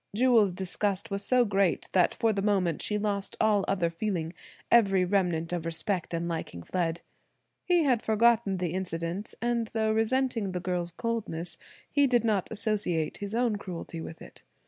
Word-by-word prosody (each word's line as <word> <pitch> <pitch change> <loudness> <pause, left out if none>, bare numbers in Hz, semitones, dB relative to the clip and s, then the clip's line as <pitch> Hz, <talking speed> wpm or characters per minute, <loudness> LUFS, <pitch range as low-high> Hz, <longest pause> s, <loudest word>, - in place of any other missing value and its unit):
Jewel's 230 -4 +4
disgust 190 +2 -2
was 200 0 -2
so 250 +1 +3
great 195 -3 +1
that 180 -2 +3
for 225 -1 +2
the 195 - -1
moment 190 -6 +1
she 210 - -1
lost 200 -1 -2
all 210 -2 +3
other 175 -4 +1
feeling, 170 -2 -2 0.4
every 195 -5 +5
remnant 175 -3 0
of 175 -2 -2
respect 165 +2 -1
and 170 0 -2
liking 160 - -5
fled. 170 - -2 0.6
He 350 -2 +3
had 250 -6 +2
forgotten 220 -2 +3
the 175 -2 -2
incident; 180 +1 -4
and 235 -1 0
though 220 -1 +1
resenting 225 -2 0
the 180 - -2
girl's 180 -1 -2
coldness, 190 -4 -3 0.3
he 285 -1 +3
did 240 -3 +3
not 210 -5 0
associate 210 -7 -1
his 205 +1 -5
own 235 -3 +1
cruelty 175 -3 -6
with 160 - -8
it. - - -14
200 Hz, 170 wpm, -28 LUFS, 175-220 Hz, 0.6 s, every